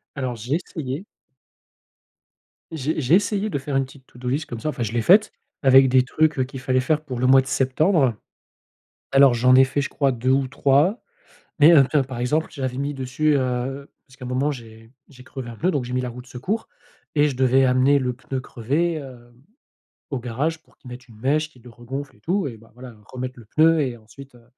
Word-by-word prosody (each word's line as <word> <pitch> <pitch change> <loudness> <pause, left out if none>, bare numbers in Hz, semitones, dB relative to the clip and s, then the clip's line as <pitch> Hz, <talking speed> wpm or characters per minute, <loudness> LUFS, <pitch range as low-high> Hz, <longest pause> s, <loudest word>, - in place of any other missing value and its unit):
Alors 130 -4 -3
j'ai 120 +6 -3
essayé. 155 -2 -5 1.7
J'ai 155 0 -2
j'ai 135 +6 +3
essayé 205 +2 +1
de 145 - -2
faire 140 0 -4
une 135 - +2
petite 135 0 -16
to-do 125 0 -8
list 140 +5 -1
comme 120 - -7
ça, 155 - -2
enfin, 135 - -5
je 115 -1 -3
l'ai 120 - 0
faite 210 - +5 0.3
avec 135 0 +6
des 130 0 +5
trucs 150 0 +1
qu'il 135 +1 -9
fallait 130 0 +1
faire 155 +4 0
pour 130 -5 -6
le 125 - +2
mois 130 +1 +6
de - - -15
septembre. 135 - +2 1.0
Alors 135 -2 +6
j'en 125 +2 +4
ai 130 - +7
fait, 130 +2 -2
je 140 - -2
crois 140 -3 0
2 125 +2 -1
ou 135 0 +2
3, 145 - +2 0.6
mais, 155 +3 +8
heu, 140 - +7
tiens, 150 -3 +2
par 130 -2 -7
exemple, 150 +6 0
j'avais 130 -3 -4
mis 140 +1 -2
dessus, 135 +3 0
heu 130 +2 -3 0.2
parce 135 0 -20
qu'à 125 - -9
un - - -6
moment 130 +4 0
j'ai 115 -3 -11 0.2
j'ai 125 -3 -15
crevé 130 -3 -8
un 115 - -9
pneu 180 +10 0
donc 140 -7 -2
j'ai 125 - -6
mis 125 - 0
la 125 - -4
roue 125 +1 -9
de 125 - -20
secours 185 - -4 0.5
et 150 0 +4
je 135 - -5
devais 130 +1 +3
amener 130 +2 +3
le 125 -1 -2
pneu 130 +2 -5
crevé, 140 +8 -2
hem, 125 -5 -10 0.8
au 135 - -2
garage 140 +7 -3
pour - - -30
qu'ils 125 - -14
mettent 125 +2 -11
une 110 -3 -17
mèche, 150 +6 0
qu'il 125 -6 -22
le 125 - -12
regonfle 135 +3 -7
et - - -24
tout 185 - -1
et 120 -4 -8
ben 115 +1 -20
voilà, 125 -1 -12
remettre 130 0 -7
le 115 - -14
pneu 160 +6 +3
et 125 -4 -3
ensuite, 120 +5 -15
heu, 120 - -19
130 Hz, 225 wpm, -22 LUFS, 125-145 Hz, 1.7 s, mais